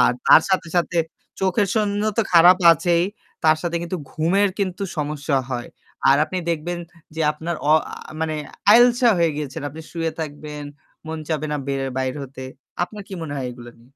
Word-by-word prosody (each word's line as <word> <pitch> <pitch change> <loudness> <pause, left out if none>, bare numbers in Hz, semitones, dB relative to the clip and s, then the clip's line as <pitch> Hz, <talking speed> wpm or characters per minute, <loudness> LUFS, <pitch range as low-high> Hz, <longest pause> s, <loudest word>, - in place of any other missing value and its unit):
আর 125 - +5 0.2
তার - - +8
সাথে, 185 -3 0
সাথে, 175 0 +1 0.4
চোখের 195 +2 +2
জন্য 205 -2 0 0.2
তো - - +5
খারাপ 175 +2 +8 0.2
আছেই। 170 0 +1 0.4
তার 155 0 +5
সাথে 170 -1 -1
কিন্তু 170 +2 -3
ঘুমের 180 +8 +2
কিন্তু 195 -1 -2
সমস্যা 145 -1 -1
হয়। 120 -1 -4 0.4
আর - - +6
আপনি 185 +4 -4
দেখবেন 170 +2 -2 0.4
যে 160 - -4
আপনার 160 +2 -4
অ - - +7 0.2
আ - - -5 0.3
মানে 160 -1 -1 0.4
আইলসা 245 +1 +6
হয়ে 165 -2 +2
গেছেন। 145 -3 -5
আপনি 155 +3 -10
শুয়ে 165 -1 -2
থাকবেন, 150 -1 -6 0.4
মন 160 0 -4
চাবে 155 -1 -1
না 150 - 0
বের 135 -1 -1
বাইর 130 -1 -1
হতে। 130 -1 -8 0.4
আপনার 210 +2 -10
কি 195 - -6
মনে 155 -3 -5
হয় 135 -2 -3
এগুলো 120 -1 -11
নিয়ে? 115 - -21
160 Hz, 180 wpm, -22 LUFS, 150-185 Hz, 0.4 s, তার